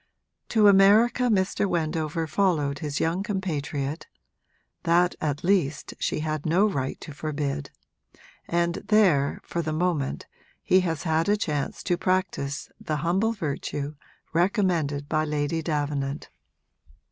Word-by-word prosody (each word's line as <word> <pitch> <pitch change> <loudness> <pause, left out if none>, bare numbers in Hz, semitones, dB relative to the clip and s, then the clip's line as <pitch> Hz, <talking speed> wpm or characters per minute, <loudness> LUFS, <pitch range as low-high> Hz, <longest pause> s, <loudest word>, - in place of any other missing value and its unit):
To 215 -2 +5
America 210 +5 +5
Mr. 200 -1 +1
Wendover 160 -1 -1
followed 155 -4 +1
his 145 -2 -3
young 165 +3 0
compatriot 155 -7 -3 0.7
(that 175 +1 +3
at 145 -1 -2
least 180 -6 +1
she - - -1
had 155 -1 -2
no 180 +6 +3
right 135 -10 -2
to 150 - -8
forbid), 145 - -3 0.8
and 170 0 +1
there, 185 -11 +3
for 170 - -3
the 155 -1 -3
moment, 155 -4 -1 0.4
he 185 - +4
has 165 -5 -2
had 160 +2 +1
a 210 - +3
chance 150 -8 -2
to 175 -2 +1
practise 185 -7 -1
the 155 - -3
humble 195 +7 +2
virtue 145 -5 -4 0.4
recommended 170 -6 +1
by 155 0 +1
Lady 150 +1 -1
Davenant. 145 -3 -2
160 Hz, 125 wpm, -26 LUFS, 145-185 Hz, 0.8 s, To